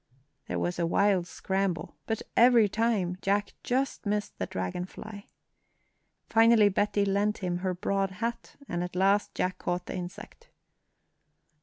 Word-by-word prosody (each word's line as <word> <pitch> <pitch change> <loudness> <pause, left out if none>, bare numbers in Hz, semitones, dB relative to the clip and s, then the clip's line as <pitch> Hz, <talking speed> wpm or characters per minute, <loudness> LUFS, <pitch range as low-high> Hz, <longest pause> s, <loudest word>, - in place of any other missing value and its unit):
There - - -2
was 175 0 -2
a 170 - +1
wild 190 0 +2
scramble, 190 -1 -2
but 225 -1 -2
every 235 -2 +6
time 205 -4 0
Jack 200 +1 0
just 260 -3 -1
missed 210 0 -2
the 95 - -2
dragon 95 - -3
fly. 205 +2 -10 1.0
Finally 225 -2 +5
Betty 205 +1 +1
lent 205 +2 +1
him 175 -1 0
her 185 0 -2
broad 195 +2 0
hat, 230 +4 -4
and 175 0 -2
at 180 0 -6
last 195 +2 +2
Jack 185 0 -1
caught 175 0 -2
the - - -5
insect. 180 0 -8
195 Hz, 145 wpm, -28 LUFS, 180-210 Hz, 1.0 s, every